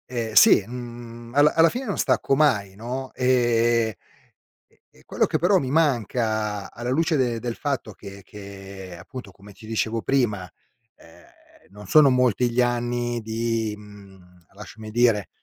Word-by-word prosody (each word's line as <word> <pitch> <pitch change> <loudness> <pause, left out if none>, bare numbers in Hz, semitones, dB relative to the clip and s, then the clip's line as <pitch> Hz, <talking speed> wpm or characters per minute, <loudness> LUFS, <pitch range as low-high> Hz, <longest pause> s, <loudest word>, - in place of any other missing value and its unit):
Eh, 115 -3 -4
sì, - - +7
mhmm, 120 -1 -9
alla 145 +1 +5
alla 165 +1 +5
fine 255 +2 -5
non 205 - -3
stacco 135 - +1
mai, 105 -10 +1
no, 125 +5 -6
e 120 -4 +1 0.7
e - - -34
e - - -23
quello - - 0
che, 155 - -1
però, 185 +5 +3
mi 130 -5 -3
manca 110 -8 0
alla 120 +1 -5
luce 160 +4 +1
del 120 -4 0
del 120 -1 -4
fatto 140 -6 -3
che 100 0 -12
che, 95 -2 -10
appunto, 105 +4 -10
come 100 +2 -16
ti 105 +3 -15
dicevo 110 0 -2
prima, 105 -9 0 0.5
ehm, - - -19 0.5
non 105 +1 -12
sono 150 +5 +6
molti 125 -1 +2
gli 120 +2 +1
anni 120 0 -1
di 110 0 -2
mhmm, 95 -4 -17
lasciami 110 +2 -11
dire, 115 -3 +2
115 Hz, 155 wpm, -23 LUFS, 105-125 Hz, 0.7 s, sì